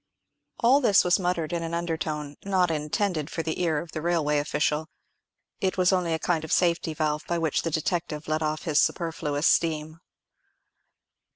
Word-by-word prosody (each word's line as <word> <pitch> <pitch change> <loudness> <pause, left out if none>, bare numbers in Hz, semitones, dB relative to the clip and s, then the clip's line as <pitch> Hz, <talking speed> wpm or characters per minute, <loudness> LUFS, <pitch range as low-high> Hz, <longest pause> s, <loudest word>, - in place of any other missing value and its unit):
All 260 +4 +5
this 210 -7 +5
was 180 +1 +3
muttered 175 -3 -1
in 170 - -1
an 165 0 -3
undertone, 155 -3 -3
not 185 -3 +2
intended 155 +1 -1
for 165 - -3
the 160 +2 -3
ear 165 -3 +1
of 165 +2 -5
the 155 - -4
railway 155 -3 +1
official. 150 +1 -1 0.7
It 190 0 -1
was 185 +1 +3
only 180 -3 +1
a - - -1
kind 160 -1 -1
of 160 - -6
safety 170 -2 +1
valve 150 -1 -1
by 170 - 0
which 160 -3 0
the 165 - -2
detective 160 -1 -2
let 155 +1 0
off 155 0 -2
his 155 -3 +3
superfluous 160 -3 -1
steam. 155 -1 +1
165 Hz, 175 wpm, -26 LUFS, 155-175 Hz, 0.7 s, All